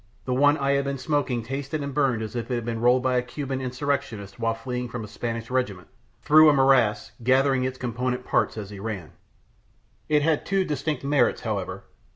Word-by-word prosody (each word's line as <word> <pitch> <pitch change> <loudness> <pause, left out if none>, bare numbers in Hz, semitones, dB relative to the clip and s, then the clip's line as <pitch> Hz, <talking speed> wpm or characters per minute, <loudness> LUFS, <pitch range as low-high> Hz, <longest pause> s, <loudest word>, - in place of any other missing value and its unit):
The 130 - -1
one 145 +3 +4
I 140 -1 +1
had 140 0 +1
been 140 0 -2
smoking 130 -3 -1
tasted 140 +4 -4
and 140 -1 -4
burned 130 -6 +1
as 110 +2 -7
if 120 +1 -4
it 125 - 0
had 120 -2 -3
been 115 -1 -3
rolled 125 +1 +4
by 130 -1 +2
a - - +3
Cuban 135 +1 -4
insurrectionist 125 -6 -3
while 115 0 0
fleeing 125 +1 -4
from 120 -2 -5
a - - -7
Spanish 115 +2 -5
regiment 105 -9 -2 0.3
through 155 +1 +7
a - - +5
morass, 130 -6 +3
gathering 130 +1 +3
its 130 0 -3
component 125 +1 -2
parts - - +1
as 105 -2 -6
he 100 - -8
ran. 100 -6 -5 1.0
It 150 -1 +3
had 155 -1 +2
two 195 0 +1
distinct 150 -2 -2
merits, 140 +1 +2
however. - - -3
130 Hz, 200 wpm, -25 LUFS, 115-140 Hz, 1.0 s, through